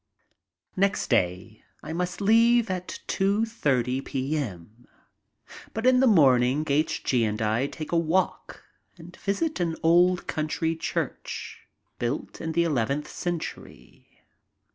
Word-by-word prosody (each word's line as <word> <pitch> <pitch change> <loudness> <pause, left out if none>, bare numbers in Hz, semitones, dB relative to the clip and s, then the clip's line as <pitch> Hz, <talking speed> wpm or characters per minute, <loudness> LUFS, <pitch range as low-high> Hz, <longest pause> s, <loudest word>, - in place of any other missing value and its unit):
Next 195 -5 0
day 95 +1 0 0.2
I 155 - -5
must 180 +3 -3
leave 230 +1 +4
at 180 -1 -5
2.30 170 - 0
p.m., 125 - -4 0.9
but 225 +2 -2
in 255 0 +5
the 265 - +4
morning 135 - +4
H. 150 +2 0
G. 125 -3 +2
and 105 -1 -1
I 110 +5 +1
take 155 +1 -8
a 170 - +2
walk 170 +3 -1 0.3
and 175 +1 -12
visit 300 +14 -2
an 170 -2 0
old 175 +2 +4
country 160 +1 -1
church 160 - -5 0.3
built 120 +4 -3
in 160 - -3
the 170 +1 +3
eleventh 145 -1 -1
century. 175 -3 -7
160 Hz, 120 wpm, -26 LUFS, 130-185 Hz, 0.9 s, in